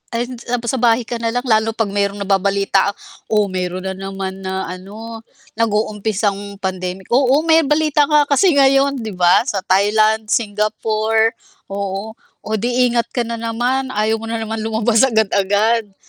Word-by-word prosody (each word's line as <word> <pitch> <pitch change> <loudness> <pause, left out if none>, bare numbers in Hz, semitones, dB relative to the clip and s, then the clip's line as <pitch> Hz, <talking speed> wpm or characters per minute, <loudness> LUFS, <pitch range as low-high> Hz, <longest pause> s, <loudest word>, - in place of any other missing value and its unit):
ay 240 +1 -1 0.2
tapos 240 -1 -2
sa 260 - -1
bahay 235 0 +3
ka 240 - -4
na 230 -1 0
lang 245 +1 -2
lalo 220 -1 +2
pag 225 -2 0
mayro'ng 200 0 -1
nababalita 195 0 +1 0.4
oh, 210 -1 +3
meron 185 0 -3
na 190 0 -3
naman 195 0 -6
na 190 0 -3
ano, 215 +6 -9 0.3
nag-uumpisang 210 -2 -1
pandemic. 185 -1 -4
Oo, 270 +4 +3
may 325 0 +4
balita 300 0 +2
nga 300 -1 +5
kasi 295 +4 +3
ngayon, 275 0 +4
'di 220 -1 -5
ba? 180 +3 +4
Sa 205 - -1
Thailand, 215 +3 +2
Singapore, 220 +1 0 0.4
oo. 200 +2 -4 0.3
Oh, 220 - -2
di 245 +3 +2
ingat 235 -1 -1
ka 245 - -1
na 235 - -3
naman, 245 +4 -1
ayaw 215 +1 +1
mo - - -6
na 230 0 -2
naman 220 0 -4
lumabas 225 +1 +2
agad-agad. 220 -1 +1
M 195 - -31
220 Hz, 165 wpm, -18 LUFS, 200-235 Hz, 0.4 s, nga